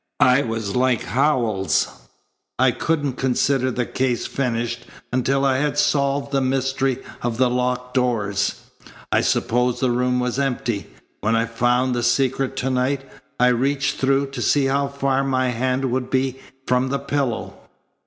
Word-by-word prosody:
I 125 +2 +5
was 115 -5 -3
like 125 -2 +2
Howells. 120 -7 +1 0.7
I - - +4
couldn't 145 -5 -1
consider 130 0 +1
the 125 -1 -1
case 130 -2 -1
finished 120 -2 -2 0.3
until 135 +2 +1
I 135 -1 +3
had 145 +1 -1
solved 140 -1 +1
the 135 -1 +1
mystery 135 0 0 0.2
of 120 -1 -2
the 125 -1 +3
locked 125 0 -1
doors. 105 -6 0 0.5
I - - +3
supposed 125 +1 +1
the 130 -2 +1
room 125 +1 +1
was 125 +1 -1
empty. 120 -6 -1 0.3
When 110 +3 +1
I 115 0 +2
found 120 +2 +1
the 120 - -1
secret 135 +2 +1
to 130 +1 -1
night, 135 +2 0 0.3
I 125 0 +5
reached 135 +3 0
through 135 +1 +1
to 140 - -5
see 145 -2 +3
how 140 +1 +1
far 140 -1 0
my 130 -1 +1
hand 130 +2 0
would 125 0 -1
be 130 0 0 0.3
from 125 +1 +1
the 140 - 0
pillow." 140 -4 -2
130 Hz, 155 wpm, -22 LUFS, 120-135 Hz, 0.7 s, I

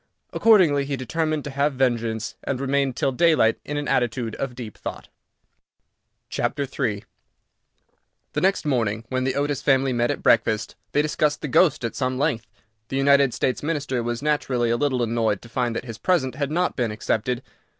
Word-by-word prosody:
Accordingly, 180 -11 +5
he 140 0 -2
determined 155 +4 -1
to 145 - -6
have 140 +2 +1
vengeance, 115 -4 0
and 135 -2 -2
remained 135 -1 0
till 135 - 0
daylight 140 -5 +3
in 145 - -4
an 145 -1 -3
attitude 120 -2 0
of 130 -3 -4
deep 120 -4 -8
thought. - - -7 1.3
III 130 -7 -1 1.3
The - - -1
next 190 -2 +2
morning, 115 -6 0
when 130 0 -1
the 130 - 0
Otis 145 -1 -1
family 135 -2 +2
met 120 0 +1
at - - -3
breakfast, 110 -1 +2 0.2
they 145 - +3
discussed 150 -1 0
the - - -3
ghost 145 -1 +3
at 115 - -4
some 130 -1 -1
length. 130 -6 0 0.4
The 135 - -3
United 140 -1 +4
States 125 - -1
Minister 145 -5 -1
was 120 +2 -3
naturally 130 -6 +1
a - - +3
little 130 -1 0
annoyed 115 -2 0
to 120 - -12
find 120 0 -1
that 120 - -4
his 115 -3 -8
present 130 -5 +1
had 140 +1 -2
not 175 +4 0
been 120 -3 0
accepted. 115 +3 -2
130 Hz, 175 wpm, -23 LUFS, 120-145 Hz, 1.3 s, Accordingly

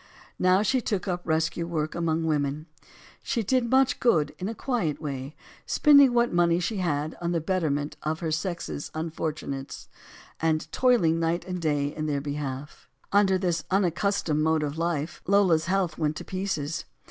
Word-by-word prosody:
Now 185 +2 +4
she 260 +3 +2
took 205 -4 -2
up 180 -1 -1
rescue 160 +1 0
work 155 -2 -2
among 165 -1 0
women. 150 -1 -1 0.6
She 230 - -1
did 245 +2 +1
much 265 +1 +3
good 155 - +2
in 190 +3 -3
a 225 - -5
quiet 215 - -1
way, 140 -1 -5 0.3
spending 280 -3 +6
what 240 -2 +2
money 170 0 +3
she 190 +4 -2
had 155 -4 -1
on 170 0 -1
the 170 - +1
betterment 155 -4 -1
of 155 +1 -2
her 165 -2 -2
sex's 165 -2 -3
un 160 +1 -3
fortunates, 150 -4 -5 0.5
and 160 -1 0
toiling 185 -11 +3
night 165 +1 0
and 180 -1 -4
day 145 -2 0
in 155 0 -3
their 145 -2 0
be 145 0 -4
half. 145 0 -6 0.2
Under 200 -2 +4
this 175 -4 -1
unaccustomed 185 -4 +1
mode 160 0 +2
of 145 0 -3
life, 165 -1 -2
Lola's 185 -5 +4
health 185 -2 0
went 155 -1 0
to - - -7
pieces. 185 -6 -3
165 Hz, 170 wpm, -26 LUFS, 155-190 Hz, 0.6 s, spending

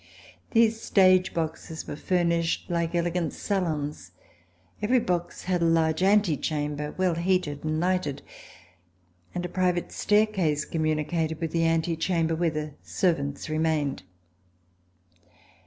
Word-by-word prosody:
These 225 -1 +3
stage 185 -1 +4
boxes 160 0 -4
were - - -5
furnished 170 +1 0
like 170 0 -1
elegant 170 -1 0
salons. 150 - -3 0.7
Every 245 +5 +3
box 175 -5 -2
had 180 -1 0
a - - +3
large 165 0 +2
antechamber, 150 -7 +1
well 185 -2 +2
heated 170 -4 0
and 155 0 -1
lighted; 180 -5 -1 1.1
and 180 0 -2
a - - -1
private 180 -1 0
staircase 195 -8 +1
com 165 - -3
municated 155 +1 -1
with 165 -2 -3
the 165 0 +2
antechamber 165 0 +1
where 165 +1 +1
the 155 -1 -4
servants 145 -6 -1
remained. 155 -4 0
165 Hz, 120 wpm, -26 LUFS, 155-180 Hz, 1.1 s, stage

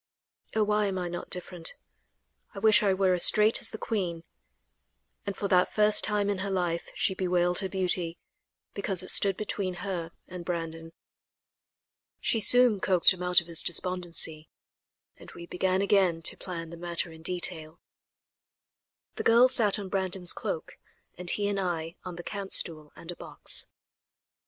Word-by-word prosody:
Oh! 220 - +2
why 210 0 0
am 190 -1 -3
I 180 -1 -3
not 175 0 -7
different; 180 -2 -6 0.8
I - - -11
wish 215 +1 +5
I 200 -2 +2
were 190 -1 +1
as 180 - 0
straight 215 +1 +4
as - - -1
the - - -8
queen," 180 -8 -4 1.0
and 200 - -4
for 200 - -3
that 180 -1 +2
first 210 0 +4
time 210 -1 0
in 200 -2 -2
her 200 +1 -4
life 175 -3 -2
she - - +1
bewailed 180 -1 0
her 190 -2 -4
beauty, 180 -3 -1 0.6
because 195 -3 -2
it - - -2
stood 195 -2 +4
between 195 -3 -3
her 170 -4 -4 0.2
and 180 -1 -9
Brandon. 165 -1 -6 1.3
She 225 - 0
soon 245 -1 +5
coaxed 185 -1 +4
him 180 - -11
out 180 0 +3
of - - -15
his 165 -1 +1
despondency, 170 -3 0 0.7
and - - -14
we 170 - -10
began 185 +2 -1
again 185 -5 +1
to - - -2
plan 170 -3 -8
the 170 - -9
matter 170 0 -4
in 160 0 -14
detail. 165 -2 -3 1.4
The - - -3
girls 240 +3 +5
sat 210 -4 +4
on 200 -2 -6
Brandon's 185 -2 +1
cloak 485 -1 -6 0.4
and 180 -1 -6
he 205 +2 -1
and 200 -1 -2
I 170 -3 -4
on 180 -1 -8
the 175 - -9
camp 200 -1 -3
stool 155 -3 +4
and 170 - -9
a - - -9
box. - - 0
185 Hz, 170 wpm, -27 LUFS, 170-200 Hz, 1.4 s, wish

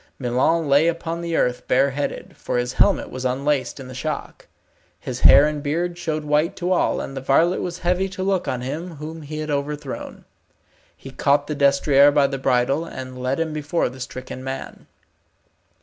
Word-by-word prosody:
Milon 135 +6 +1
lay 140 +3 +4
upon 170 0 -2
the 170 -1 -2
earth 125 -3 0
bareheaded, 140 +2 0
for - - -3
his 125 +1 -1
helmet 200 - +2
was 130 - -6
unlaced 135 +1 -1
in 135 - -8
the 130 - -9
shock. 150 +3 -5 0.5
His - - -5
hair 140 - +8
and 150 -1 -2
beard 170 +5 -1
showed 160 -3 -3
white 150 +5 +1
to 180 -1 -2
all, 185 - +2
and 135 - -6
the 135 - -4
varlet 160 +7 +2
was 175 -1 -4
heavy 180 +2 0
to 185 0 -5
look 190 -2 0
on 125 - -2
him 160 +7 -5
whom 155 +2 -7
he 155 +1 -7
had 155 0 -3
overthrown. 145 -1 -4 0.7
He 135 - -10
caught 145 +2 +2
the 150 - -3
destrier 140 0 +5
by 145 -1 +3
the 135 -1 -2
bridle, 135 +4 +1
and 130 -5 -8
led 130 +4 -1
him 160 -1 -1
before 155 +1 -1
the 130 +1 -12
stricken 130 0 -7
man. 135 0 -7
145 Hz, 185 wpm, -22 LUFS, 135-165 Hz, 0.7 s, hair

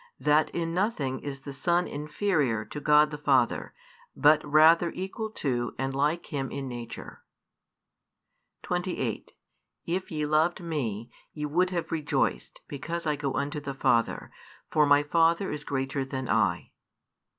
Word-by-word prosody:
That 150 +1 +3
in 165 -1 -3
nothing 170 - -1
is 140 -2 -6
the 140 0 -8
Son 170 +6 +1
inferior 150 - -1
to 150 - -7
God 150 +1 +4
the 150 - -6
Father, 135 -5 +2 0.4
but 150 +1 +5
rather 160 +3 +5
equal 195 +4 -4
to 120 - -2
and 135 0 -2
like 150 +5 -1
Him 135 -2 -2
in 140 -1 -5
nature. 120 -2 -8 1.4
28 - - -3 0.5
If 185 +3 -2
ye 150 -2 -2
loved 155 +3 +2
Me, 125 - -4 0.2
ye 150 -1 -4
would 175 +5 +1
have 175 -2 -3
rejoiced, 150 - -1
because 165 +4 -5
I 150 -1 +1
go 140 -2 -3
unto 145 +2 -2
the 140 -2 -6
Father; 115 -3 +1 0.4
for 150 -1 +4
My 145 0 +5
Father 165 +4 +2
is 150 0 -4
greater 135 -1 -2
than 130 -1 -5
I. 105 -6 +1
150 Hz, 145 wpm, -28 LUFS, 135-165 Hz, 1.4 s, but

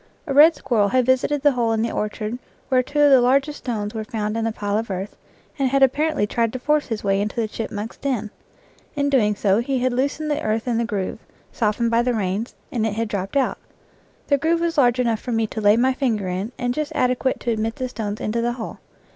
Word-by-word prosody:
A 285 - -2
red 310 +4 +7
squir 245 -6 -1
rel 205 - +4
had 255 +3 +2
visited 260 +3 +1
the 290 - +6
hole 235 -3 0
in 220 0 0
the 230 - -1
orchard 215 +2 -3 0.3
where 255 -1 +4
two 290 +4 -3
of 290 -1 +6
the 265 -2 +7
largest 275 +4 +2
stones 210 -4 -3
were 220 -1 -3
found 215 -1 -3
in 225 - -1
the 225 - 0
pile 205 -1 -3
of 225 - -5
earth, 190 +2 -4 0.4
and 270 -1 +2
had 275 +1 +3
apparently 295 -1 +2
tried 230 +1 0
to - - -2
force 300 +3 +1
his 225 -3 -4
way 195 0 +1
into 210 +1 -3
the 230 -2 0
chipmunk's 215 0 -5
den. 240 -7 -2 0.6
In 285 0 0
doing 210 -6 +3
so 200 0 +2
he 260 +3 -1
had 255 0 0
loosened 285 +4 -1
the 295 - -1
earth 220 +2 -1
in 235 -2 +1
the 235 - 0
groove, 205 -2 -3 0.3
softened 230 +1 0
by 230 +1 +4
the 245 0 0
rains, 205 +3 -2 0.2
and 235 -3 -1
it 215 - -2
had 225 0 -2
dropped 200 +5 -2
out. 270 - 0 0.7
The 280 -1 +2
groove 330 +3 +1
was 335 -1 0
large 245 -2 +4
enough 230 -3 +1
for 245 - -4
me 225 0 +1
to 220 0 -5
lay 205 +1 +5
my 260 +2 +3
finger 230 -8 -1
in 185 +5 -3
and 245 -1 -1
just 305 +2 -3
adequate 255 +1 +1
to 240 - -1
admit 225 0 -1
the 255 - -3
stones 215 -4 -4
into 230 +2 -1
the 240 +1 0
hole. 240 -2 -7
235 Hz, 245 wpm, -22 LUFS, 215-265 Hz, 0.7 s, red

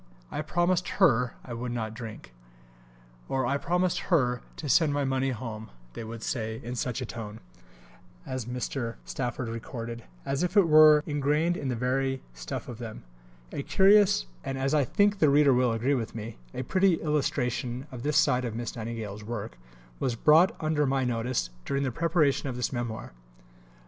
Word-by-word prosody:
"I - - -2
promised 175 +3 +1
Her 125 - +4
I 125 - -6
would 120 +1 -4
not 110 -2 -3
drink," 110 - -9 1.0
or 130 -1 0
"I 140 +3 +1
promised 180 +3 0
Her 125 -8 +2
to 150 - -6
send 155 +2 +4
my 145 -1 +1
money 135 0 0
home," 110 -3 -5 0.2
they - - -6
would 115 0 -7
say, 110 -2 -3
"in 120 - -5
such 125 +1 -2
a - - -2
tone," 110 -2 -7 0.9
as 130 -3 -4
Mr. 125 -1 -3
Stafford 125 -1 -3
recorded, 115 0 -6 0.2
"as 135 +1 -1
if 180 +4 0
it 195 -4 +6
were 155 -1 +7
ingrained 150 +3 +1
in 140 - -4
the 125 - -1
very 130 +2 -1
stuff - - -6
of 120 -2 -8
them." 110 - -7 0.5
A - - -3
curious 195 - +5 0.2
and, 135 - -3
as 135 +2 0
I 145 -3 +3
think 205 - +2
the 155 - +5
reader 140 -1 +5
will 125 -1 +3
agree 115 +5 +1
with 115 -5 -2
me, 110 0 -7
a 130 - -4
pretty 185 +6 +3
illustration 130 -5 -1
of 125 -2 -7
this 150 +2 +1
side 125 -5 +3
of 115 -3 -3
Miss 120 0 -4
Nightingale's 110 -3 -5
work, 105 - -5 0.4
was 125 -3 0
brought 155 +9 +5
under 155 -2 +1
my 135 0 +1
notice 120 - -1
during 140 - -1
the 130 - -1
preparation 155 -2 +1
of 125 - -4
this 125 +1 -2
Memoir. 120 - -4
130 Hz, 180 wpm, -28 LUFS, 115-150 Hz, 1.0 s, were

